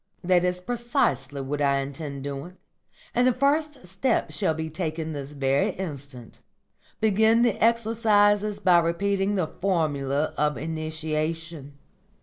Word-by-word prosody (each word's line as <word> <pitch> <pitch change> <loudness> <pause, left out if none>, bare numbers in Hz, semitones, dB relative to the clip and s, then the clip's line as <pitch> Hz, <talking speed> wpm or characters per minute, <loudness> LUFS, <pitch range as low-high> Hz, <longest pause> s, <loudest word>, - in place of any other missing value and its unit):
"That 180 0 +3
is 180 0 -1
precisely 145 - -1
what 145 +2 -3
I 140 -1 +3
intend 140 0 -5
doing, 145 +6 -6 0.6
and 250 +1 +3
the - - +5
first 280 +1 0
step 190 +9 0
shall 185 -6 0
be 160 0 -3
taken 160 -1 -4
this 140 0 -6
very 140 0 +1
instant. 140 - -8 0.6
Begin 220 +2 +4
the 235 -4 +1
exercises 215 -3 +3
by 180 -4 +5
repeating 195 +4 0
the 185 -4 +1
Formula 155 -5 -1
of 150 -2 +1
Initiation. 155 0 -4
165 Hz, 130 wpm, -25 LUFS, 145-205 Hz, 0.6 s, the